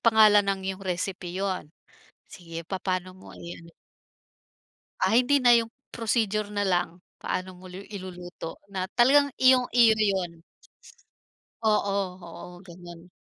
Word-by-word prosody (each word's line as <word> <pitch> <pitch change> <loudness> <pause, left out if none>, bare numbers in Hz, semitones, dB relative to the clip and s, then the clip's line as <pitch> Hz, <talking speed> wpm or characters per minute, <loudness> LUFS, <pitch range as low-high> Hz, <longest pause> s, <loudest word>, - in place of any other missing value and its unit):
pangalan 215 -3 +6
ng 195 -1 0
iyong 190 +1 -11
recipe 180 0 -3
'yun. 190 -5 -2 0.6
Sige, 170 -2 -9
papaano 185 -1 -3
mo - - -13
i-ano. 170 -1 -10 1.3
Ah, 190 +4 +2
hindi 255 +4 +4
na 245 -1 +6
'yung, 230 -1 +2 0.2
procedure 215 -2 0
na 205 0 -1
lang. 175 -1 0 0.2
Paano 185 0 -3
mo 185 - -16
lu 185 +2 -8
iluluto, 180 -4 -8
na 185 -1 -3
talagang 285 +4 +5
iyong-iyo 245 -3 +5
na 215 - +2
'yun. 175 -4 -2 1.2
Oo, 210 -2 +2 0.3
oo, 175 +1 -11
ganyan. 175 -1 -13
190 Hz, 125 wpm, -26 LUFS, 175-220 Hz, 1.3 s, pangalan